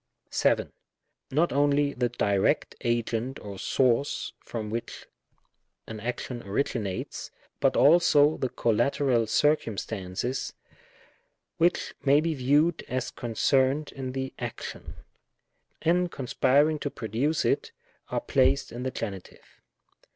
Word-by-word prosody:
7. - - +1 0.6
Not 160 +6 +1
only 145 0 +2
the 125 -1 0
direct 100 -4 +1
agent 120 +2 -1
or 100 -2 -8
source 130 +4 +1
from 110 -3 -6
which 115 +1 -5 0.8
an 110 - -7
action 120 +2 -4
originates, 100 -2 -3 0.3
but - - +2
also 155 -1 +5
the 130 - -1
collateral 120 +1 +1
circum 145 -5 +2
stances, 105 +6 -3 1.0
which 175 +2 +1
may 140 +1 +5
be 165 +1 0
viewed 145 +5 +2
as 130 0 -2
concerned 130 +5 +1
in 130 -2 -5
the 130 0 -4
ac - - -5
tion, - - -11 0.9
and 175 +1 +2
conspiring 145 +3 +2
to 145 - -2
produce 130 +7 -1
it, - - 0 0.4
are - - -1
placed 135 +1 +2
in 120 - -6
the 130 - -1
Genitive. 100 -7 -8
130 Hz, 115 wpm, -27 LUFS, 115-145 Hz, 1.0 s, also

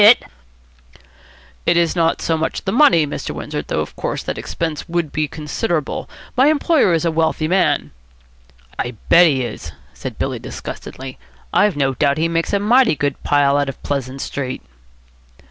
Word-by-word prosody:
"It 170 - +4
is 170 0 +2
not 165 -1 +1
so 165 - +1
much 160 0 -2
the 190 - 0
money, 190 - +5
Mr. 145 - -5
Windsor, - - -4
though, - - -2
of - - -6
course, - - -3
the - - -3
expense 160 -2 -4
would 170 -3 -1
be 155 -1 0
considerable. 155 +2 -3 0.3
My 260 +3 +5
employer 305 - +3
is 165 +1 +1
a 165 - +2
wealthy 160 -1 0
man." 185 +2 +1 0.9
"I 120 0 -2
bet 175 +1 +8
he 135 -4 +1
is," 105 -9 -6 0.2
said - - -7
Billy - - -2
disgustedly. 130 0 -8 0.3
"I've 205 -7 +3
no 135 -2 +1
doubt 140 +1 +1
he 160 +1 +2
makes 165 0 -1
a 200 - +3
mighty 235 -1 +4
good 145 -1 -2
pile 145 -1 +3
out 145 -1 0
of 135 - -9
Pleasant 135 -1 -3
Street." 130 -2 -4
160 Hz, 165 wpm, -19 LUFS, 140-175 Hz, 0.9 s, bet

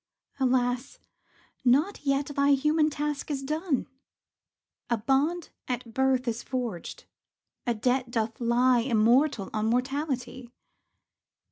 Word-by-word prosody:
Alas, 250 -1 0 0.7
not 290 +11 +2
yet 275 +1 +2
thy 280 0 +4
human 300 +3 +3
task 295 -1 -3
is 275 -2 -2
done! 305 0 -1 1.0
A 235 - +2
bond 280 +9 0 0.2
at 245 -2 -4
birth 265 0 +1
is 235 0 -1
forged; 240 -9 -5 0.6
a 240 - +1
debt 250 +3 0
doth 225 0 -2
lie 240 +1 +3
Immortal 235 0 +2
on 215 0 0
mortality. 255 0 -2
255 Hz, 110 wpm, -27 LUFS, 240-280 Hz, 1.0 s, thy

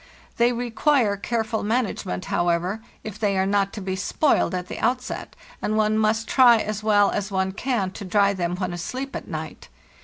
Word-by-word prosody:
They 235 +1 +4
require 240 -1 +1
careful 220 +2 -2
management, 210 - -2
however, 175 +4 0 0.2
if 215 -1 -7
they 205 -3 +1
are 190 - +2
not 200 0 +1
to 210 - -6
be 190 0 -3
spoiled 190 +2 +1
at 180 0 -4
the - - -6
outset, 250 +2 -2 0.3
and 215 - 0
one 215 0 +2
must 220 0 +1
try 245 -3 +6
as 215 -1 -3
well 205 -2 +4
as 200 -1 -2
one 190 -1 0
can 210 -2 -1
to 200 - -8
dry 200 +1 +3
them 175 -2 -2
when 180 -1 -3
asleep 255 +11 -5
at - - -6
night. - - -7
210 Hz, 185 wpm, -24 LUFS, 190-230 Hz, 0.3 s, try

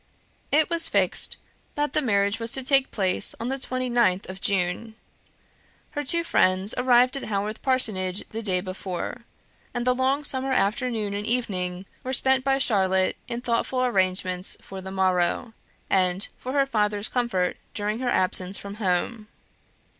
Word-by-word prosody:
It 310 +2 +4
was 335 -1 +2
fixed - - +3 0.4
that 295 0 -1
the 305 - +2
marriage 200 -4 +1
was 230 0 -1
to 265 - -1
take 270 0 +3
place 190 -3 +1
on 230 - -3
the 270 - -1
29th 240 -7 0
of 190 0 -8
June. 195 +4 -1 1.0
Her 290 - -3
two 335 +5 +2
friends 190 - +2
arrived 250 0 +4
at - - -5
Haworth 210 +1 -3
Parsonage 210 -8 0
the 225 - -5
day 185 -4 0
before; 185 +5 -6 0.5
and 240 0 -2
the 250 - +4
long 265 +3 0
summer 265 -1 +2
afternoon 220 -2 0
and 205 +2 -4
evening 185 -6 -2 0.2
were 260 - -3
spent 265 0 +3
by 270 0 +2
Charlotte 190 -7 +2
in 235 0 -4
thoughtful 250 +1 0
arrangements 185 -4 0
for 190 0 -9
the 190 - -7
morrow, 190 +4 0 0.3
and 185 +1 +1
for 255 - -5
her 280 -1 +3
father's 210 -4 0
comfort 230 -8 -1 0.2
during 210 +2 -2
her 255 -1 -1
absence 185 -2 +2
from 200 +1 -8
home. 210 +4 -1
220 Hz, 155 wpm, -25 LUFS, 190-255 Hz, 1.0 s, It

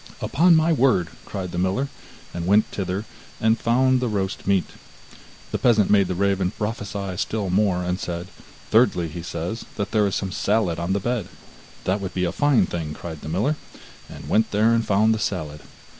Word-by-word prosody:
'Upon 170 +3 +4
my 160 +1 +3
word!' 125 - +3 0.2
cried 95 -2 -5
the 85 - -3
miller, 95 +10 0 0.5
and 85 0 -4
went 105 +3 +5
thither, 95 +2 -3 0.3
and 110 +1 +2
found 130 +2 +3
the 125 - -1
roast 100 -4 -3
meat. 100 -3 +3 0.9
The - - -1
peasant 110 -5 +3
made 100 -2 +5
the 90 - -2
raven 95 -1 +1
prophesy 100 -2 -4
still 100 -2 -2
more, 95 -2 +2
and 90 +1 -2
said: 85 +1 -5 0.4
'Thirdly, 85 -2 +3
he 85 +2 -6
says 90 +5 -4
that 100 0 -3
there 105 -2 +3
is 100 - -2
some 95 -2 -2
salad 100 -6 0
on 85 +3 -1
the 100 - +1
bed.' 115 -2 -2 0.5
'That 95 +2 0
would 95 -1 -5
be 90 -1 +1
a 85 - -1
fine 145 +5 +3
thing!' 80 -3 -4
cried 80 -3 -8
the 75 - -7
miller, 110 - 0 0.5
and - - -10
went 110 +1 +2
there 110 +3 +3
and 115 -1 +1
found 105 +3 +4
the 110 - -2
salad. 80 -7 -3
100 Hz, 190 wpm, -23 LUFS, 90-110 Hz, 0.9 s, went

